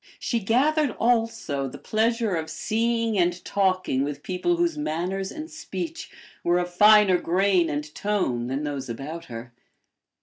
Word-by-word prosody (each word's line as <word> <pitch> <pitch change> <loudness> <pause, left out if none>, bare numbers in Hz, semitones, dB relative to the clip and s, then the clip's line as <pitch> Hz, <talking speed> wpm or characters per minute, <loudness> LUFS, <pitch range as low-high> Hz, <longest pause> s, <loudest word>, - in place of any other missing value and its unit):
She 235 - -1
gathered 280 +8 +2
also 225 - 0
the 125 - -8
pleasure 225 -1 0
of 160 -1 -3
seeing 230 -1 0
and 175 0 +1
talking 185 -9 +1
with 145 0 -5
people 185 - 0
whose 345 -1 +1
manners 190 - -2
and 310 0 -6
speech 330 0 -6 0.3
were 175 +1 +3
of 175 0 -2
finer 210 -1 +6
grain 180 0 +2
and 150 +1 -4
tone 135 -13 -1
than 135 +3 -2
those 140 -3 -4
about 150 +8 -6
her. 120 0 -9
190 Hz, 145 wpm, -25 LUFS, 155-230 Hz, 0.3 s, finer